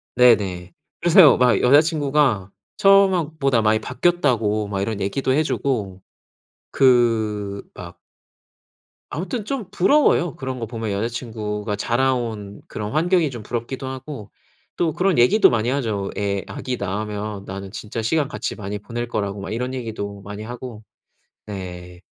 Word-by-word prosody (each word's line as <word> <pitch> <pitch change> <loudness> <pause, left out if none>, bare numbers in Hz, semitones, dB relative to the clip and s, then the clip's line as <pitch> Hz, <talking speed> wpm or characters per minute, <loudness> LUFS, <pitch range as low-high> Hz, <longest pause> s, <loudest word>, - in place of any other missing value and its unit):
네네. 100 -8 +3 0.3
그래서요 170 -3 +7
막 125 -1 +3
여자친구가 145 - +3 0.3
처음 195 -1 +6
하 170 -5 0
보다 135 -5 +2
많이 110 0 +3
바뀌었다고 120 -7 +1
막 100 -1 -3
이런 105 +1 -2
얘기도 130 +7 0
해 155 +4 +3
주고 105 -11 -2 0.7
그 110 -6 +2
막 85 -1 -10 1.1
아무튼 190 +7 -4
좀 240 -6 -4
부러워요 190 - +3
그런 130 -1 -5
거 115 - -3
보면. 110 -1 -4
여자친구가 105 -1 -3
자라온 115 -3 -1
그런 105 0 -5
환경이 170 +1 +2
좀 120 -5 -8
부럽기도 120 +4 -4
하고 130 -4 -7 0.5
또 165 -3 +1
그런 185 0 +1
얘기도 125 - +6
많이 115 0 0
하죠. 110 -8 -1
애 100 -1 -1
아기 130 -1 -4
낳으면 105 0 -4
나는 95 0 -7
진짜 110 +2 -5
시간 145 +6 +1
같이 145 - -4
많이 105 -1 -5
보낼 120 +3 -5
거라고 100 -3 -3
막 - - -6
이런 125 +3 -3
얘기도 110 -5 -5
많이 105 +2 -8
하고 120 -1 -8 0.6
네. 90 -3 -8
115 Hz, 300 characters per minute, -22 LUFS, 105-135 Hz, 1.1 s, 그래서요